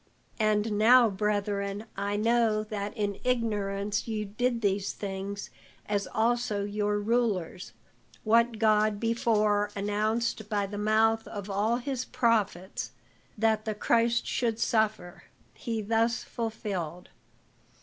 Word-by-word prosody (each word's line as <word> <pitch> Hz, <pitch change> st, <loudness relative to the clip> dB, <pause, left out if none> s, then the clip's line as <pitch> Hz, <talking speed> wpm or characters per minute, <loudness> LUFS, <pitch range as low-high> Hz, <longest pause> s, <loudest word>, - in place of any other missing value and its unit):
And 215 Hz, 0 st, +1 dB
now, 235 Hz, +1 st, +6 dB
brethren, 205 Hz, 0 st, -1 dB
I 200 Hz, +1 st, -2 dB
know 225 Hz, -1 st, +2 dB
that 210 Hz, -1 st, -5 dB
in 205 Hz, -2 st, -2 dB
ignorance 210 Hz, -4 st, -1 dB
ye 215 Hz, -2 st, -2 dB
did 235 Hz, +4 st, -1 dB
these 200 Hz, -1 st, 0 dB
things, 200 Hz, 0 st, -5 dB, 0.3 s
as 205 Hz, -1 st, -1 dB
also 225 Hz, -2 st, 0 dB
your 205 Hz, 0 st, -1 dB
rulers; 205 Hz, -5 st, -1 dB, 0.5 s
what 230 Hz, +1 st, +3 dB
God 215 Hz, -1 st, +3 dB
before 215 Hz, -2 st, +1 dB
announced 215 Hz, +2 st, -1 dB
by 205 Hz, -2 st, 0 dB
the 205 Hz, +1 st, -6 dB
mouth 220 Hz, +1 st, +2 dB
of 205 Hz, -1 st, -6 dB
all 210 Hz, +4 st, +1 dB
his 255 Hz, 0 st, -3 dB
prophets 210 Hz, -7 st, 0 dB, 0.5 s
that 220 Hz, 0 st, +1 dB
the 215 Hz, -1 st, -2 dB
Christ 235 Hz, +2 st, +2 dB
should 230 Hz, -3 st, -1 dB
suffer, 215 Hz, -6 st, 0 dB, 0.3 s
he 225 Hz, -2 st, -4 dB
thus 230 Hz, +3 st, +1 dB
fulfilled. 200 Hz, -7 st, -4 dB
215 Hz, 120 wpm, -28 LUFS, 205-230 Hz, 0.5 s, now